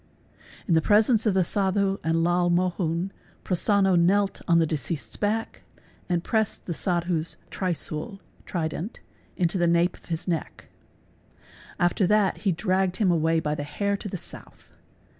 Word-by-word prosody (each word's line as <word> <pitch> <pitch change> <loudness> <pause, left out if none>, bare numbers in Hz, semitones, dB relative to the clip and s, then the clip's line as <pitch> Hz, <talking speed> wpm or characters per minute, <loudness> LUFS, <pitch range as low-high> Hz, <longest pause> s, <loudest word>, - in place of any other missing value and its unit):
In 175 - +2
the 160 - +4
presence 220 +4 +4
of 200 - +2
the 190 - +4
Sadhu 195 +1 0
and 165 +1 +1
Lal 175 +1 +2
Mohun, 175 0 0 0.3
Prosonno 195 +1 +2
knelt 195 +3 +2
on 170 -2 +5
the. 165 - +4
deceased' 155 0 -4
s - - -1
back 220 +2 -2 0.5
and 175 -1 0
pressed 220 -2 -1
the 175 - -3
Sadhu's 170 -2 -1
¢riswl 185 +2 -3 0.3
(trident) 170 +4 -3 0.4
into 180 0 +1
the 175 - +3
nape 170 +1 +2
of - - -20
his 165 +1 -4
neck. 165 -4 -4 1.1
After 175 +2 +2
that 210 -1 +3
he 200 - 0
dragged 185 +1 0
him 195 -5 +3
away 165 0 +2
by 150 -1 -1
the 150 - -3
hair 200 +8 -1
to 205 - -6
the 190 - -4
south. - - -9
180 Hz, 160 wpm, -26 LUFS, 165-195 Hz, 1.1 s, on